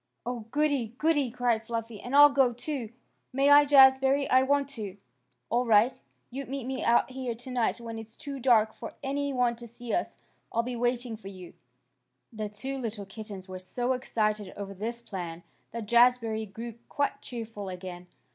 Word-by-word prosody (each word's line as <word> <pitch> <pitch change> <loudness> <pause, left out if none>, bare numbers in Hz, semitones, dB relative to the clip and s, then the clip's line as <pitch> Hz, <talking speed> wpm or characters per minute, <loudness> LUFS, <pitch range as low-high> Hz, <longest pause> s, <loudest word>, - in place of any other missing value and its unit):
"Oh, 240 -3 -4
goody! 280 -5 0
goody!" 295 -4 +2
cried 235 -2 0
Fluffy. 230 -2 -5
"And 245 +3 -3
I'll 290 0 +9
go, 265 -3 +3
too. 245 -2 -4 0.4
May 275 +2 +3
I, 290 0 +8
Jazbury? 270 0 +6
I 255 0 +6
want 280 +1 +2
to." 210 -8 -6 0.5
"All 240 +2 +3
right. 230 +1 +4 0.4
You 270 +3 -4
meet 275 -1 -4
me 260 0 -3
out 235 +2 +3
here 255 -2 -4
tonight 245 0 -1
when 230 -1 -6
it's 225 0 -10
too 280 -2 -7
dark 225 -4 +4
for - - -9
any 280 +1 -1
one 245 -2 +1
to 235 0 -9
see 235 +1 -6
us. 350 - -1 0.3
I'll 230 - +1
be 250 +1 -4
waiting 240 0 -1
for 210 - -11
you." 185 -3 -10 0.8
The 215 -1 -4
two 265 +6 -4
little 220 -4 -4
kittens 200 -1 -8
were 185 -1 -7
so 245 +7 -1
excited 215 -5 -1
over 200 -1 -6
this 230 +4 -4
plan 175 -6 -6 0.3
that 230 -2 -6
Jazbury 235 -1 +3
grew 230 +2 -7
quite 285 -1 -1
cheerful 225 -5 -6
again. 180 -1 -8
235 Hz, 175 wpm, -28 LUFS, 215-265 Hz, 0.8 s, I'll